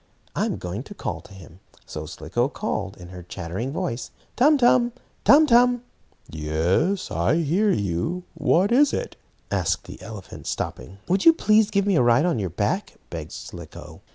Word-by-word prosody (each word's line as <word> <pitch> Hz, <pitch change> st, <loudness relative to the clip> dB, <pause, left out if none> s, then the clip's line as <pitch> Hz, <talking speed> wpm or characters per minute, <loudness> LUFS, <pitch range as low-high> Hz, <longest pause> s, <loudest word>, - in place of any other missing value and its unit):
I'm -, -, 0 dB
going 90 Hz, +5 st, -5 dB
to 205 Hz, -, -11 dB
call 85 Hz, -, -4 dB
to 95 Hz, -, -15 dB
him." 90 Hz, -1 st, -14 dB, 0.3 s
So 75 Hz, 0 st, -7 dB
Slicko 90 Hz, -, -2 dB
called, 100 Hz, -7 st, -4 dB
in 90 Hz, -1 st, -11 dB
her 90 Hz, -1 st, -9 dB
chattering 90 Hz, +8 st, -5 dB
voice: 155 Hz, -6 st, -3 dB, 0.3 s
"Tum 295 Hz, +4 st, +5 dB
Tum! 245 Hz, -1 st, +4 dB, 0.3 s
Tum 300 Hz, +3 st, +7 dB
Tum!" 245 Hz, -2 st, +4 dB, 0.4 s
"Yes, 80 Hz, -, 0 dB
I 85 Hz, -, +1 dB
hear 170 Hz, +6 st, +2 dB
you. 100 Hz, -, -1 dB
What 190 Hz, +6 st, +2 dB
is 280 Hz, +4 st, +4 dB
it?" -, -, -3 dB, 0.4 s
asked -, -, 0 dB
the -, -, -11 dB
elephant, 105 Hz, -4 st, -9 dB
stopping. 65 Hz, +10 st, -4 dB
"Would 190 Hz, +2 st, +1 dB
you 330 Hz, -, +9 dB
please 215 Hz, -8 st, +3 dB
give 200 Hz, -2 st, +1 dB
me 200 Hz, -4 st, +2 dB
a -, -, +4 dB
ride 120 Hz, +5 st, +4 dB
on 170 Hz, -10 st, +1 dB
your 95 Hz, -3 st, -2 dB
back," 105 Hz, -, -2 dB, 0.2 s
begged -, -, -6 dB
Slicko. -, -, -10 dB
130 Hz, 170 wpm, -24 LUFS, -, 0.4 s, you